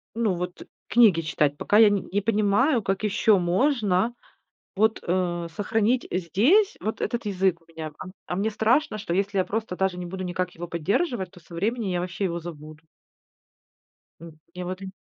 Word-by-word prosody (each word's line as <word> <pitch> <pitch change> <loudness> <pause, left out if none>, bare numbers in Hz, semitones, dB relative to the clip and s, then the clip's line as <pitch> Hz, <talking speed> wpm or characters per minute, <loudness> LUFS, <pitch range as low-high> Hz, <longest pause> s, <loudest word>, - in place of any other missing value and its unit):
Ну, 225 -4 +1
вот 180 0 -5 0.2
книги 215 -8 +5
читать, 150 -2 0
пока 210 - +2
я 220 -1 +8
н 205 -2 -1
не 205 +2 +1
понимаю, 225 +5 +2
как 195 +1 -2
ещё 210 0 +3
можно 205 +2 +1 0.6
вот, 220 +2 +2
э, 175 -1 -1
сохранить 225 +4 +1
здесь 235 - +3
вот 220 - -3
этот 235 -2 -2
язык 190 -3 +1
у - - -29
меня, 160 -1 -7
ам, 185 - -8
а 180 - -3
мне 205 +4 0
страшно, 225 +4 +1
что 195 -5 -4
если 195 +1 0
я 185 - +3
просто 220 -2 -3
даже 190 -1 0
не 175 - -5
буду 185 +2 -6
никак 180 0 -3
его 175 +1 -7
поддерживать, 190 - -1
то 180 - -15
со 170 +1 -14
временем 215 +5 -1
я 175 - 0
вообще 180 +2 -3
его 170 -2 -1
забуду. 155 -1 -10 1.4
М, 165 -2 -11 0.2
и 180 - -6
вот 185 +2 -5
ин 190 - -7
190 Hz, 185 wpm, -25 LUFS, 175-220 Hz, 1.4 s, я